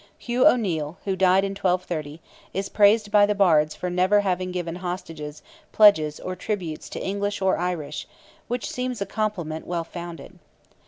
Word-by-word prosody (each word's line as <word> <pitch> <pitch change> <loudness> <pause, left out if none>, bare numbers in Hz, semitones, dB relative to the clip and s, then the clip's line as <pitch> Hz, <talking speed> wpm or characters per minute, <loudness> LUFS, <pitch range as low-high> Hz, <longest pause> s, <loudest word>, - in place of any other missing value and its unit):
Hugh 250 +4 +2
O'Neil, 175 - +1
who 195 -2 0
died 190 +1 +4
in 195 - -3
1230, 175 -5 -2 0.4
is 195 +1 -2
praised 210 0 +4
by 205 -1 +6
the 210 - 0
Bards 155 -6 +3
for 180 - -4
"never 185 +3 +3
having 185 -2 -1
given 175 -1 -4
hostages, 165 -5 -6 0.3
pledges, 160 -9 +5
or 185 - -5
tributes 180 -5 -4
to - - -6
English 200 +1 -2
or 190 -2 +1
Irish," 165 -5 -3 0.4
which 245 0 -3
seems 250 -5 -3
a 200 - -1
compliment 195 -7 -3
well 170 -1 -2
founded. 170 -3 -9
185 Hz, 160 wpm, -24 LUFS, 165-205 Hz, 0.4 s, by